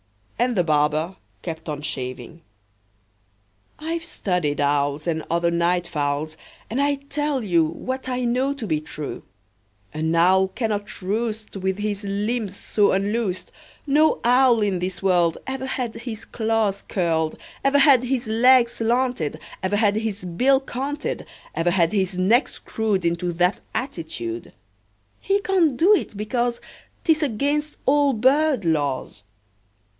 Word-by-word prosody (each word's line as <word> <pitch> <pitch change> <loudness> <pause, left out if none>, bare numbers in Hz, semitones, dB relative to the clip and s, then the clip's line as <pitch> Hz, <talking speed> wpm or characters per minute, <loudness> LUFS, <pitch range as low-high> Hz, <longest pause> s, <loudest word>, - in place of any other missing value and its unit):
And 245 0 +2
the 180 - +3
barber 155 +3 +1 0.3
kept 160 -2 -6
on 145 -1 -4
shaving. 130 +3 -6 1.4
"I've 325 +2 -3
studied 180 - -1
owls, 145 +1 +1
And 160 -2 -1
other 170 0 +1
night 170 +1 +1
fowls, 150 0 -2 0.4
And 255 +5 0
I 285 0 +2
tell 280 -1 -2
you 175 -5 +3
What 260 +11 -4
I 250 0 -1
know 255 +3 +1
to 250 - -5
be 155 -6 0
true: 150 -1 -6 0.7
An 160 +2 -1
owl 190 +3 +5
cannot 205 -2 -3
roost 215 +2 -2
With 190 0 -1
his 210 0 -3
limbs 205 +1 -2
so 205 -2 +2
unloosed; 200 0 -1 0.3
No 300 +2 +3
owl 245 -2 +5
in 195 -3 0
this 180 +1 -3
world 175 -3 +3
Ever 265 0 -4
had 245 -4 -2
his 230 -3 -7
claws 220 -3 0
curled, 165 -4 0 0.3
Ever 275 +1 +4
had 275 -3 +6
his 250 -1 -1
legs 235 +2 +5
slanted, 235 - 0 0.2
Ever 190 +2 0
had 205 -1 +2
his 220 -4 -3
bill 255 +11 +3
canted, 275 +2 -4 0.3
Ever 165 +1 +1
had 170 -2 +2
his 190 -3 0
neck 220 +8 +4
screwed 210 -5 -2
Into 170 +1 0
that 180 +3 +1
attitude. 120 - -4 0.7
He 395 +1 +1
can't 345 -10 +2
do 370 +9 +6
it, 295 - 0
because 235 +3 -1 0.4
'T 330 - +3
is 315 0 +2
against 295 +3 -1
all 285 0 +4
bird 260 - +3
laws. 145 -9 -1
205 Hz, 140 wpm, -23 LUFS, 170-255 Hz, 1.4 s, had